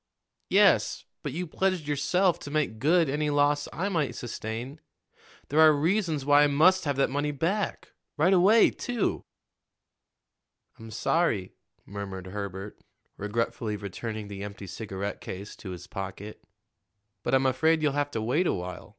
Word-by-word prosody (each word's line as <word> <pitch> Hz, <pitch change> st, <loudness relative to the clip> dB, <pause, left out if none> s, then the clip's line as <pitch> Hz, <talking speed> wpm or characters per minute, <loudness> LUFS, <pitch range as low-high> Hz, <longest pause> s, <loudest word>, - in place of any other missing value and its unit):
"Yes, -, -, +3 dB, 0.2 s
but -, -, -4 dB
you 175 Hz, +6 st, -3 dB
pledged 185 Hz, -1 st, -1 dB
yourself 170 Hz, +5 st, +1 dB
to -, -, -8 dB
make 145 Hz, -7 st, -1 dB
good 165 Hz, +4 st, +3 dB
any 150 Hz, +2 st, 0 dB
loss 145 Hz, 0 st, +2 dB
I 185 Hz, +5 st, -2 dB
might 165 Hz, -8 st, -1 dB
sustain. 120 Hz, +5 st, -6 dB, 0.7 s
There 150 Hz, -, +1 dB
are 160 Hz, -1 st, +8 dB
reasons 160 Hz, -1 st, 0 dB
why 145 Hz, 0 st, +6 dB
I 150 Hz, -, +6 dB
must 165 Hz, +6 st, +4 dB
have 145 Hz, -2 st, 0 dB
that 135 Hz, 0 st, +1 dB
money 145 Hz, +2 st, 0 dB
back 170 Hz, +7 st, -2 dB, 0.3 s
right 170 Hz, +6 st, +4 dB
away, 200 Hz, +5 st, +6 dB
too." 245 Hz, -4 st, -2 dB, 1.5 s
"I'm 115 Hz, 0 st, -10 dB
sorry," 110 Hz, -, 0 dB, 0.3 s
murmured 95 Hz, -2 st, -6 dB
Herbert, 100 Hz, +1 st, -6 dB, 0.4 s
regretfully 105 Hz, +1 st, -2 dB
returning 105 Hz, +2 st, -6 dB
the 100 Hz, -1 st, -7 dB
empty 100 Hz, -1 st, -7 dB
cigarette 100 Hz, +1 st, -5 dB
case 100 Hz, +3 st, -7 dB
to 95 Hz, -, -9 dB
his 90 Hz, -1 st, -7 dB
pocket; 95 Hz, +3 st, -7 dB, 0.8 s
"but 135 Hz, -, +1 dB
I'm 135 Hz, 0 st, +2 dB
afraid 160 Hz, +5 st, +2 dB
you'll 150 Hz, -, +3 dB
have 145 Hz, 0 st, 0 dB
to 110 Hz, -5 st, -3 dB
wait 150 Hz, +11 st, +1 dB
a -, -, +2 dB
while. 90 Hz, 0 st, -6 dB
140 Hz, 150 wpm, -27 LUFS, 105-160 Hz, 1.5 s, are